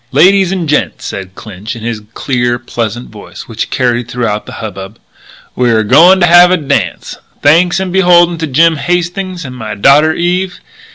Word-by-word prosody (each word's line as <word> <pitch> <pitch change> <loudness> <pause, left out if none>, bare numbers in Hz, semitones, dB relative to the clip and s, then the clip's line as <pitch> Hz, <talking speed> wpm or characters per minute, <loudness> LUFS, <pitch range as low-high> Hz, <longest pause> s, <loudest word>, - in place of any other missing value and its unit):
"Ladies 190 +6 +3
and 180 -4 -3
gents," 150 0 -2
said 95 -1 -7
Clinch 105 +1 -8
in 115 - -10
his 115 -2 -4
clear, 120 -2 -1
pleasant 120 -1 -5
voice, 105 -2 -12
which 115 -1 -5
carried 120 -2 -1
through 125 0 -3 0.2
the - - -9
hubbub, 100 -1 -8 0.6
"we're 120 -3 +1
a - - -2
going 175 - +5
to - - +5
have 175 +1 +6
a 185 - +2
dance 135 - -3 0.2
thanks 175 +5 +3
and 190 -2 -4
beholden 175 -2 +3
to 160 - -3
Jim 160 +4 +2
Hastings 175 +1 -3
and 125 -1 -8
my 110 -3 -6
daughter 145 +9 +4
Eve. 180 +2 -2
145 Hz, 175 wpm, -11 LUFS, 115-175 Hz, 0.6 s, have